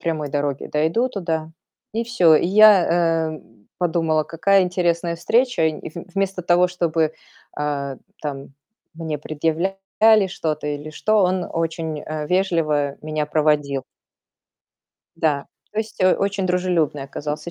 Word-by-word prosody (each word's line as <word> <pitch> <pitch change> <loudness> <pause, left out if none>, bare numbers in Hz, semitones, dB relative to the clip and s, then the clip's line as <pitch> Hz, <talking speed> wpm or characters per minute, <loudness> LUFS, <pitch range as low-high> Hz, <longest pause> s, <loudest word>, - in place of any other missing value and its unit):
прямой 155 -3 -2
дороге 145 -2 -2
дойду 160 +12 +1
туда, 165 -8 -3 0.4
и 230 +2 -1
всё. 185 -9 +4
И 170 - +1
я, 175 -5 +5
э, - - -13 0.4
подумала: 165 -3 +1
"Какая 180 +6 +3
интересная 175 -2 0
встреча". 240 +5 +1
И 155 -1 -4
в 170 +2 -8
вместо 195 -2 -1
того, 175 +1 +3
чтобы, 165 -3 0 0.4
а, 140 -2 -3 0.3
там, 140 -2 -5 0.5
мне 160 -2 -4
предъявляли 195 +7 +1
что-то 155 -4 -3
или 145 +1 -5
что, 215 +8 0
он 180 -1 0
очень, 165 -2 -2
э, 155 0 -5
вежливо 155 -6 +1
меня 155 -1 -2
проводил. 150 -3 +1 1.3
Да. 150 -4 0 0.3
То 210 - -4
есть, 220 0 -4
э, 185 0 +5
очень 200 -1 -1
дружелюбный 180 -5 0
оказался 150 +4 -5
165 Hz, 130 wpm, -21 LUFS, 150-185 Hz, 1.3 s, я